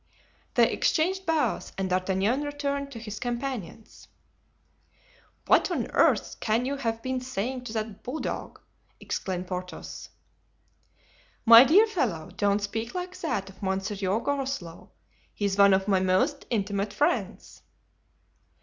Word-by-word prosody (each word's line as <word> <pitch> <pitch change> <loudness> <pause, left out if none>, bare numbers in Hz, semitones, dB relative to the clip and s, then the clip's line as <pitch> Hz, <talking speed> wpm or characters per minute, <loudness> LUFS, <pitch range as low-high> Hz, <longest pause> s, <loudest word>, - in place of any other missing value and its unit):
They - - +5
exchanged 375 +3 0
bows 320 -2 0
and 195 -1 -1
D'Artagnan 190 +7 +1
returned 280 -1 -3
to 245 - -8
his 215 -2 -7
companions. 240 -5 -5 1.4
"What - - +4
on - - -2
earth - - +2
can 225 +3 +1
you 280 +2 -2
have 230 -4 -3
been 260 0 -2
saying 250 +1 -4
to 225 - -6
that 220 -2 -4
bulldog?" 270 +6 -5 0.4
exclaimed 185 -1 -3
Porthos. 180 0 -7 1.4
"My 230 +1 +11
dear 350 - +6
fellow, 235 - -2
don't 205 0 +1
speak 225 - -4
like 365 0 -4
that 210 - -2
of 190 - -21
Monsieur 195 +1 -1
Groslow. 270 -11 -4 0.5
He's 200 -1 -1
one 200 0 +7
of 190 +1 +2
my 195 -2 +3
most 190 - +1
intimate 205 -2 -1
friends." 295 - -1
225 Hz, 125 wpm, -27 LUFS, 195-275 Hz, 1.4 s, My